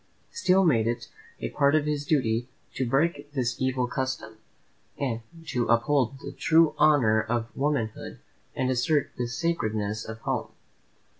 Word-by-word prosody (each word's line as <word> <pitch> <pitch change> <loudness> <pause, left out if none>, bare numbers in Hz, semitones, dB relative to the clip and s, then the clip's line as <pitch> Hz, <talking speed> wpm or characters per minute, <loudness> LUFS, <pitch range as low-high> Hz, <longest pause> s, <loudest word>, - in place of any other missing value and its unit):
Steele 195 - +3
made 115 -9 +3
it 120 0 -3 0.3
a - - -3
part 140 0 +3
of 155 -1 +2
his 145 -1 -2
duty 120 -5 +1 0.3
to 130 -2 -2
break 145 +1 0
this 125 -3 -1
evil 130 -1 +1
custom, 130 -4 -4 0.6
to 130 +1 -3
uphold 130 +2 +2
the - - -5
true 160 0 +3
honour 135 -8 +5
of 115 +1 -3
womanhood, 135 -6 -2 0.4
and 130 0 0
assert 140 +4 +1
the 120 - 0
sacredness 110 -7 -1
of 110 +1 -7
home. - - -3
130 Hz, 140 wpm, -27 LUFS, 115-150 Hz, 0.6 s, honour